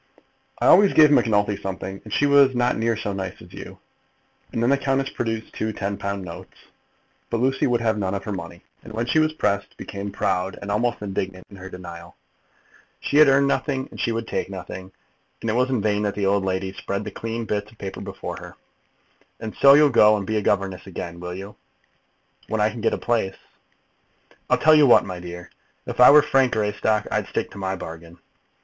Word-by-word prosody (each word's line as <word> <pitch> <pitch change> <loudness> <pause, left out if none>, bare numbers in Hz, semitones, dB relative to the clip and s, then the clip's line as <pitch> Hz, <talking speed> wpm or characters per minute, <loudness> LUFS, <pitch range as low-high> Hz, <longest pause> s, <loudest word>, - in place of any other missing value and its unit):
"I - - -2
always 200 -1 +6
gave 155 -2 +7
Macnulty 105 -6 +3
something, 95 0 -6
and 110 - -12
she 145 - +2
was 140 -2 +5
not 120 0 +1
near 115 0 0
so 100 -2 -3
nice 95 -1 -5
as - - -15
you." - - -10 0.7
And 115 - -2
then 120 - +3
the 140 - +4
countess 135 0 0
produced 115 -1 -4
two 110 - -2
ten 100 0 -3
pound 100 -1 -4
notes. 85 - -10 0.7
But 115 - -1
Lucy 135 +2 +1
would 120 -2 +1
have 110 -2 0
none 95 -1 -1
of 100 - -4
her 105 - -5
money, 85 -2 -7 0.2
and 110 - -11
when 115 +2 -2
she 155 - +2
was 155 0 +2
pressed, 100 -9 -2
became 100 0 -6
proud 90 0 -1
and 100 - -5
almost 115 +1 -1
indignant 95 -2 -4
in 100 - -11
her 95 0 -9
denial. 85 -2 -10 0.8
She 145 - -1
had 155 -1 +8
earned 140 0 +4
nothing, 135 0 -1
and - - -11
she 115 - 0
would 115 0 -3
take - - -3
nothing; 95 0 -8 0.5
and 115 - -2
it - - -1
was 125 +2 +1
in 125 -6 0
vain 105 -1 +1
that 105 -1 -1
the 100 - -1
old 100 0 +2
lady 95 0 -2
spread 100 +1 -4
the - - -6
clean 115 0 -5
bits 105 0 -3
of 115 - -21
paper 95 -2 -7
before - - -6
her. - - -11 0.8
"And 110 -1 -6
so 140 0 +9
you'll 150 -1 +5
go 105 -2 +6
and 100 - -4
be 110 +2 -1
a - - 0
governess 95 -2 -1
again; 85 -2 -7
will 90 0 -6
you?" 100 +2 -9 0.9
"When 110 - -2
I 105 +1 +2
can 115 - -8
get 115 - +1
a - - -5
place." 110 -5 -1 1.1
"I'll - - +4
tell 155 - +5
you 150 -2 +6
what, 120 - +6
my 90 -2 -6
dear. 90 0 -9 0.3
If - - -6
I 125 - +9
were 150 +1 +8
Frank 135 -3 +2
Greystock, 105 0 0
I'd - - -1
stick - - -3
to - - -10
my 95 0 -2
bargain." 85 -1 -10
105 Hz, 215 wpm, -23 LUFS, 95-120 Hz, 1.1 s, so